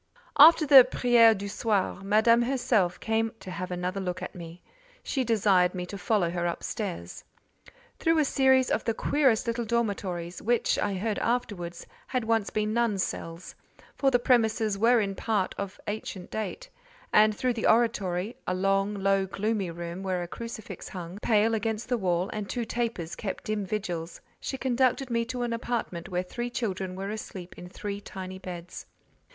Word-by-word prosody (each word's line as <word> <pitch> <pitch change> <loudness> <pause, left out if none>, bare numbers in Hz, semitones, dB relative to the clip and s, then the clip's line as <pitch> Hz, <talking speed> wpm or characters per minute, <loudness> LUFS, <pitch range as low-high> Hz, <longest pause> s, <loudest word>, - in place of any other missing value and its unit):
After 310 +2 +9
the 275 -3 +10
"prière 240 -3 +5
du 200 +1 -5
soir," 200 -2 -1
Madame 220 +4 +4
herself 235 -8 +1
came 225 +1 0
to 185 - -8
have 185 0 -5
another 180 +2 -3
look 185 -1 -3
at - - -6
me. 170 0 -10 0.4
She 265 - -1
desired 195 -6 +3
me 180 -1 -3
to 190 - -8
follow 190 -2 +1
her 175 0 -1
up 170 - -4
stairs. 85 +1 -5 0.8
Through 330 -1 +2
a 305 - +3
series 265 -2 +3
of - - +1
the 230 - -1
queerest 265 -5 +2
little 235 0 -1
dormitories—which, 205 -2 -1
I 205 -1 0
heard 210 +2 -2
afterwards, 200 -8 -2 0.2
had 255 -2 -1
once 225 -2 +1
been 215 0 -1
nuns' 230 -5 +1
cells: 165 +2 -6 0.4
for 275 - +2
the 250 - +4
premises 225 -4 +2
were 230 +4 +4
in 200 -2 -1
part 200 -1 -1
of 200 0 -5
ancient 205 -3 -5
date—and - - -1
through 255 -1 +1
the 230 - -1
oratory—a 210 -4 +1
long, 195 +2 +1
low, 195 -1 +1
gloomy 205 -1 -1
room, 170 +2 -6
where 185 -2 -1
a - - -6
crucifix 230 +2 -8
hung, 180 0 -7
pale, 220 0 +3
against 220 +1 -2
the 245 - +2
wall, 180 -1 0
and 210 -2 -4
two 240 -2 -2
tapers 225 -8 -3
kept 195 - -5
dim 210 -2 -2
vigils—she 180 +5 -5
conducted 260 0 +1
me 230 0 +1
to 250 0 -3
an 235 -1 -1
apartment 230 -7 -3
where 180 -1 -1
three 240 +6 -4
children 190 -6 -3
were 195 +2 -4
asleep 190 -4 -7
in 180 - -10
three 200 +1 -5
tiny 190 -1 -7
beds. 180 -1 -8
210 Hz, 170 wpm, -28 LUFS, 185-235 Hz, 0.8 s, the